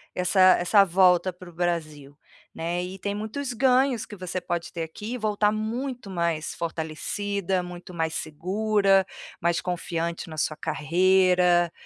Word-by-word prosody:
essa 180 +2 0 0.2
essa 200 +3 +5
volta 180 0 +4
para 180 0 -12
o - - -15
Brasil, 155 -5 -3 0.4
né. 170 +2 -2
E 185 +2 -7
tem 200 +2 -3
muitos 235 +6 -4
ganhos 255 -1 +2
que 210 - -10
você 185 0 -4
pode 170 -1 -3
ter 170 - -3
aqui 210 +8 -7
e - - -3
voltar 210 -1 +1
muito 235 +2 -4
mais 170 -4 -1
fortalecida, 180 +4 -2
muito 180 0 -9
mais 160 -2 -1
segura, 195 +5 +1 0.4
mais 170 0 +1
confiante 170 -1 -3
na 160 - -8
sua 155 0 -1
carreira, 180 +1 +3
180 Hz, 145 wpm, -25 LUFS, 170-205 Hz, 0.4 s, essa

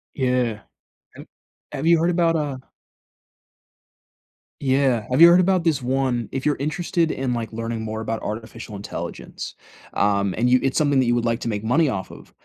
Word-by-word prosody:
Yeah. 125 -5 0 0.5
Em - - -11 0.5
have 145 +1 -3
you 170 -1 +5
heard 170 +2 +2
about 170 -1 +2
a 145 -4 -3 2.0
Yeah, 130 -5 +1
have 130 - +1
you 170 - +10
heard 175 +1 +6
about 185 -1 +2
this 155 -5 +1
1 125 -2 -1
if 135 +1 -4
you're 150 - +2
interested 165 +2 0
in, 130 -2 -2
like, 115 -1 -4
learning 115 0 -4
more 110 0 -4
about 110 0 -3
artificial 110 0 -6
intelligence, 100 +1 -7 0.4
um, 100 -2 +1
and 120 +2 +2
you 125 - +5
it's 135 - 0
something 145 -3 +3
that 130 - +3
you 120 - +3
would 120 - 0
like 115 0 0
to - - -5
make 105 -2 -2
money 145 +7 +2
off 95 -6 -4
of, - - -14
130 Hz, 185 wpm, -22 LUFS, 115-150 Hz, 2.0 s, you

